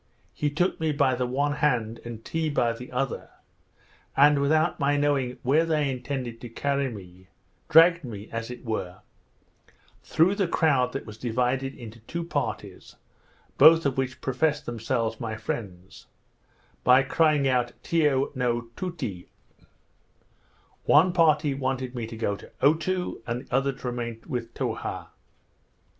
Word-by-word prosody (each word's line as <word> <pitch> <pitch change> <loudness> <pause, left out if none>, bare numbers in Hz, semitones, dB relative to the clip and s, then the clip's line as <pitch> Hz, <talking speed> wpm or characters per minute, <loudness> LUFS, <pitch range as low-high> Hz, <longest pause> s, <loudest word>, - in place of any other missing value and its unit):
He 150 - -1
took 175 +6 0
me 160 -1 +1
by 140 -3 +2
the 125 0 -1
one 140 +4 0
hand, 115 -7 0
and 115 -1 -8
Tee 160 -1 -1
by 120 -5 +1
the 125 +2 -10
other; 125 +1 -3 0.9
and, 145 0 +6
without 155 +3 +2
my 145 +1 +2
knowing 140 -4 0
where 145 +6 +3
they 155 -4 +1
intended 125 -2 -5
to 120 - -7
carry 140 +3 -1
me, 95 -4 -11 0.4
dragged 165 +1 +6
me, 105 -5 -7
as 115 0 -4
it 125 +1 -9
were, 95 -6 -4 1.0
through 170 +5 +3
the 200 -3 0
crowd 145 -7 +2
that 135 - -4
was 110 0 -10
divided 125 +3 -1
into 115 -2 -10
two 170 +10 -5
parties, 170 - -4 0.6
both 165 0 +8
of 135 -2 +1
which 130 -1 -3
professed 150 +3 0
themselves 115 -1 -2
my 110 -2 -4
friends, 95 -5 -6 0.8
by 130 +2 +6
crying 150 0 +2
out 125 -2 +1
Tiyo 145 -4 +1
no 120 -2 -1
Tootee. 130 - -5 1.6
One 175 +5 +5
party 155 -4 +3
wanted 130 -2 -2
me 120 -3 -4
to 115 0 -8
go 105 -3 -1
to - - -14
Otoo, 170 +2 +1
and 120 +1 -2
the - - -12
other 135 +1 +2
to 130 -1 -8
remain 120 -2 -5
with 120 -2 -4
Towha. - - -4
130 Hz, 150 wpm, -26 LUFS, 120-150 Hz, 1.6 s, both